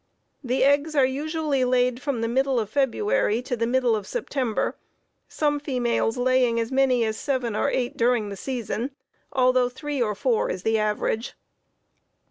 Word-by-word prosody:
The 255 Hz, +1 st, +1 dB
eggs 285 Hz, +3 st, +2 dB
are 275 Hz, -2 st, +5 dB
usually 295 Hz, 0 st, -1 dB
laid 250 Hz, 0 st, +1 dB
from 280 Hz, -5 st, -2 dB
the 230 Hz, -, 0 dB
middle 265 Hz, +1 st, +1 dB
of 215 Hz, -2 st, -4 dB
February 230 Hz, -5 st, +1 dB
to 250 Hz, -1 st, -2 dB
the 230 Hz, 0 st, -1 dB
middle 250 Hz, -2 st, +2 dB
of 210 Hz, -, -5 dB
September, 270 Hz, -, -2 dB, 0.5 s
some 295 Hz, -1 st, 0 dB
females 245 Hz, -4 st, 0 dB
laying 250 Hz, -2 st, +2 dB
as 230 Hz, +1 st, -2 dB
many 260 Hz, -3 st, +3 dB
as 220 Hz, 0 st, -2 dB
seven 255 Hz, -5 st, -2 dB
or 280 Hz, -, +1 dB
eight 250 Hz, -3 st, -2 dB
during 235 Hz, -3 st, +2 dB
the 200 Hz, -, -6 dB
season, 245 Hz, +3 st, -4 dB, 0.4 s
though 255 Hz, -1 st, +3 dB
three 290 Hz, +1 st, -4 dB
or 210 Hz, -3 st, 0 dB
four 235 Hz, +1 st, +1 dB
is 180 Hz, 0 st, -4 dB
the 225 Hz, 0 st, +2 dB
average. 215 Hz, +2 st, -1 dB
250 Hz, 165 wpm, -24 LUFS, 230-270 Hz, 0.5 s, are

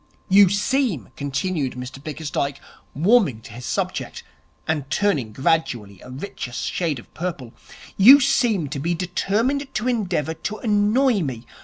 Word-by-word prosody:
'You 195 Hz, 0 st, +7 dB
seem,' 205 Hz, -, 0 dB
continued 140 Hz, 0 st, -2 dB
Mr 125 Hz, +2 st, -8 dB
Bickersdyke, 145 Hz, -2 st, -3 dB, 0.4 s
warming 175 Hz, -, +3 dB
to -, -, -12 dB
his 120 Hz, +1 st, -8 dB
subject, -, -, -3 dB, 0.4 s
and 150 Hz, -4 st, -2 dB
turning 145 Hz, -, 0 dB
gradually 120 Hz, -, -1 dB
a -, -, -12 dB
richer 130 Hz, -2 st, -7 dB
shade 160 Hz, +3 st, -2 dB
of 120 Hz, -, -14 dB
purple, 160 Hz, -9 st, -5 dB, 0.4 s
'you 255 Hz, +9 st, +9 dB
seem 235 Hz, -, +2 dB
to 140 Hz, -, -4 dB
be 170 Hz, +5 st, -1 dB
determined 220 Hz, -, -1 dB
to 215 Hz, +3 st, -1 dB
endeavour 185 Hz, -, -1 dB
to 215 Hz, +6 st, -5 dB
annoy 220 Hz, +2 st, +2 dB
me.' 125 Hz, -6 st, -4 dB
170 Hz, 140 wpm, -22 LUFS, 135-210 Hz, 0.4 s, you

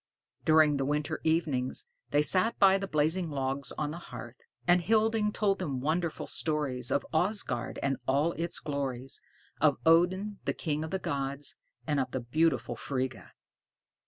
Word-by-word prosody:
During 155 Hz, -2 st, +5 dB
the 135 Hz, -, 0 dB
winter 150 Hz, +2 st, -1 dB
evenings, 155 Hz, -6 st, +1 dB, 0.2 s
they 145 Hz, -, +3 dB
sat 190 Hz, +8 st, +2 dB
by 195 Hz, 0 st, +6 dB
the 195 Hz, -, -3 dB
blazing 160 Hz, +2 st, +1 dB
logs 135 Hz, -1 st, -2 dB
on 150 Hz, -1 st, -1 dB
the 170 Hz, -, -6 dB
hearth, 120 Hz, -7 st, -9 dB, 0.3 s
and 175 Hz, 0 st, +5 dB
Hilding 220 Hz, +2 st, +2 dB
told 205 Hz, -2 st, +1 dB
them 135 Hz, -3 st, -2 dB
wonderful 160 Hz, +4 st, -1 dB
stories 140 Hz, -6 st, -1 dB
of -, -, +1 dB
Asgard 180 Hz, -, -1 dB
and 135 Hz, -1 st, +1 dB
all 145 Hz, +5 st, +3 dB
its 170 Hz, +1 st, -3 dB
glories, 135 Hz, -3 st, -3 dB, 0.4 s
of -, -, +4 dB
Odin 185 Hz, +5 st, +3 dB
the -, -, +1 dB
king 155 Hz, -2 st, -2 dB
of 160 Hz, -, -5 dB
the 190 Hz, -, -1 dB
gods, 140 Hz, -4 st, -3 dB, 0.3 s
and 150 Hz, -2 st, +1 dB
of 130 Hz, -1 st, 0 dB
the 130 Hz, -, -2 dB
beautiful 125 Hz, -1 st, +1 dB
Frigga. 130 Hz, 0 st, -4 dB
150 Hz, 160 wpm, -30 LUFS, 135-175 Hz, 0.4 s, by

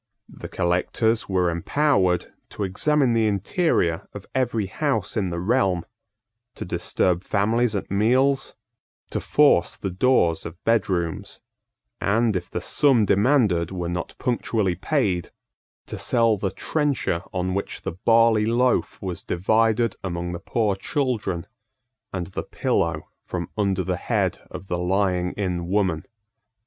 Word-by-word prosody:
The -, -, -9 dB
collectors 100 Hz, +6 st, 0 dB
were 90 Hz, -2 st, +2 dB
empowered 95 Hz, -, +1 dB, 0.2 s
to 105 Hz, -, -5 dB
examine 130 Hz, +7 st, +2 dB
the 115 Hz, -1 st, +2 dB
interior 100 Hz, -, 0 dB
of -, -, -8 dB
every 120 Hz, -5 st, 0 dB
house 110 Hz, 0 st, -2 dB
in 100 Hz, -5 st, 0 dB
the 85 Hz, 0 st, -3 dB
realm, 95 Hz, -3 st, +1 dB, 0.7 s
to -, -, -6 dB
disturb 90 Hz, 0 st, 0 dB
families 110 Hz, +3 st, +1 dB
at 100 Hz, -, -4 dB
meals, 130 Hz, +7 st, +2 dB, 0.6 s
to -, -, -1 dB
force 140 Hz, -11 st, +3 dB
the 95 Hz, -1 st, -4 dB
doors 90 Hz, -5 st, +2 dB
of 85 Hz, +2 st, -9 dB
bedrooms, 95 Hz, -7 st, -1 dB, 0.6 s
and, 110 Hz, +1 st, +2 dB
if 90 Hz, -1 st, -3 dB
the 90 Hz, -, -4 dB
sum 130 Hz, -, +3 dB
demanded 100 Hz, -, +3 dB
were 90 Hz, -2 st, -4 dB
not 85 Hz, 0 st, -4 dB
punctually 115 Hz, -6 st, 0 dB
paid, 95 Hz, -, -1 dB, 0.6 s
to -, -, -7 dB
sell 115 Hz, -2 st, +3 dB
the 100 Hz, -1 st, -2 dB
trencher 145 Hz, -, -1 dB
on 90 Hz, 0 st, -2 dB
which 100 Hz, -, -4 dB
the 95 Hz, -, -2 dB
barley 115 Hz, +3 st, +3 dB
loaf 125 Hz, +2 st, +1 dB
was 95 Hz, 0 st, -4 dB
divided 110 Hz, +2 st, +1 dB
among 85 Hz, -1 st, -3 dB
the 85 Hz, -, -5 dB
poor 105 Hz, +2 st, 0 dB
children, 105 Hz, -, -2 dB, 0.7 s
and 90 Hz, -2 st, -3 dB
the -, -, -2 dB
pillow 85 Hz, -2 st, -1 dB, 0.2 s
from -, -, -5 dB
under 100 Hz, -3 st, 0 dB
the -, -, -2 dB
head -, -, -1 dB
of 95 Hz, -, -9 dB
the 90 Hz, -1 st, -2 dB
lying 90 Hz, 0 st, 0 dB
in 90 Hz, -4 st, -2 dB
woman. 95 Hz, -4 st, 0 dB
100 Hz, 135 wpm, -24 LUFS, 90-115 Hz, 0.7 s, force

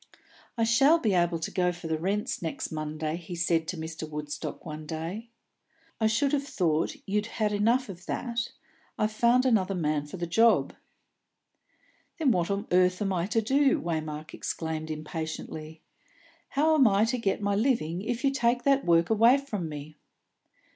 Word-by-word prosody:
"I 230 Hz, -, +2 dB
shall 270 Hz, +8 st, +5 dB
be 220 Hz, -11 st, 0 dB
able 175 Hz, -1 st, +2 dB
to 160 Hz, -, -4 dB
go 180 Hz, -1 st, +1 dB
for 175 Hz, -1 st, -11 dB
the 160 Hz, -1 st, -1 dB
rents 200 Hz, +5 st, -1 dB
next 165 Hz, -2 st, -4 dB
Monday," 155 Hz, 0 st, -3 dB
he 175 Hz, 0 st, -8 dB
said 170 Hz, -2 st, +1 dB
to 180 Hz, -, -4 dB
Mr. 160 Hz, 0 st, -6 dB
Woodstock 150 Hz, 0 st, -6 dB
one 155 Hz, -1 st, -7 dB
day. 170 Hz, +9 st, -5 dB, 0.7 s
"I 220 Hz, -, +3 dB
should 270 Hz, +6 st, +1 dB
have 285 Hz, -, +2 dB
thought 165 Hz, -, 0 dB
you'd 210 Hz, +1 st, -1 dB
had 215 Hz, -2 st, -1 dB
enough 230 Hz, +5 st, +2 dB
of 185 Hz, -2 st, -10 dB
that. 235 Hz, -1 st, -3 dB, 0.5 s
I've 215 Hz, 0 st, +1 dB
found 240 Hz, +3 st, +3 dB
another 200 Hz, -6 st, +2 dB
man 150 Hz, -3 st, -1 dB
for 170 Hz, -, -8 dB
the 175 Hz, -, -2 dB
job." 225 Hz, +7 st, +3 dB, 1.4 s
"Then 305 Hz, -6 st, +3 dB
what 175 Hz, -4 st, +1 dB
on 200 Hz, +1 st, -1 dB
earth 180 Hz, 0 st, +3 dB
am 195 Hz, -2 st, 0 dB
I 175 Hz, 0 st, -1 dB
to 225 Hz, +2 st, +1 dB
do?" 275 Hz, +4 st, +3 dB
Waymark 155 Hz, -2 st, -4 dB
exclaimed 160 Hz, -1 st, -4 dB
impatiently. 155 Hz, 0 st, -6 dB, 0.7 s
"How 310 Hz, +3 st, +2 dB
am 280 Hz, -6 st, +6 dB
I 200 Hz, +1 st, +4 dB
to 245 Hz, +2 st, -1 dB
get 200 Hz, -4 st, 0 dB
my 200 Hz, 0 st, +1 dB
living 200 Hz, -, 0 dB
if 235 Hz, +4 st, -3 dB
you 275 Hz, -, +3 dB
take 240 Hz, -2 st, +1 dB
that 275 Hz, -1 st, +3 dB
work 170 Hz, +2 st, +3 dB
away 230 Hz, +4 st, +6 dB
from 210 Hz, -, -4 dB
me?" 150 Hz, 0 st, -8 dB
185 Hz, 175 wpm, -28 LUFS, 160-230 Hz, 1.4 s, am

